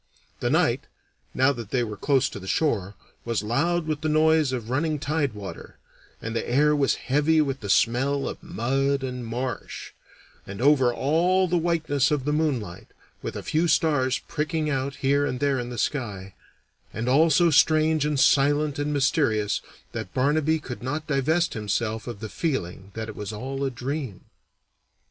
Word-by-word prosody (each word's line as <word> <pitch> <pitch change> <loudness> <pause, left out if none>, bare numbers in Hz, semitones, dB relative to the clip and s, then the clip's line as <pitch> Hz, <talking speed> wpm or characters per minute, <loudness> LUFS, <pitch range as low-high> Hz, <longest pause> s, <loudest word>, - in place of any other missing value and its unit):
The - - 0
night, - - +1 0.5
now 130 +2 +4
that 115 -5 -8
they 125 0 +1
were 110 -2 -5
close 135 +4 +2
to - - -8
the 95 - -10
shore, 100 - 0 0.3
was 115 -4 -1
loud 160 +10 0
with 155 -2 -2
the 155 - -1
noise 155 -2 +3
of 120 -2 -4
running 155 +3 0
tide 145 -2 -1
water, 100 -2 -9 0.4
and 115 0 -5
the 115 - -2
air 150 +4 +3
was 140 -2 +2
heavy 150 +4 +2
with 140 -3 0
the 100 - -7
smell 135 +7 +2
of - - -6
mud 135 -4 -1
and 125 -1 -4
marsh, 120 +3 -5 0.6
and 100 +1 -7
over 135 -2 +4
all 175 +9 +2
the 175 0 +1
whiteness 160 -5 +1
of 145 -3 -1
the 150 - 0
moonlight, 115 - -2 0.3
with - - -5
a - - -5
few 160 +3 +1
stars 135 -6 +2
pricking 155 0 -1
out 135 0 -2
here 140 +1 +1
and 125 - -3
there 140 -1 +1
in 120 0 -4
the 120 - -6
sky; 105 -8 -3 0.6
and 115 +2 -4
all 150 +6 +5
so 170 +2 +4
strange 155 +1 +4
and 150 -2 0
silent 145 +1 +3
and 145 +1 -1
mysterious 110 -7 +1 0.3
that - - -6
Barnaby 150 +4 +2
could 130 -5 -8
not 145 +5 -3
divest 155 +4 +1
himself 110 +1 -2
of 115 -4 -7
the 110 - -4
feeling 100 - -3
that 110 -1 -4
it 110 - -8
was 105 0 -5
all 135 +6 -4
a 135 - +1
dream. 130 - -5
135 Hz, 175 wpm, -25 LUFS, 120-150 Hz, 0.6 s, all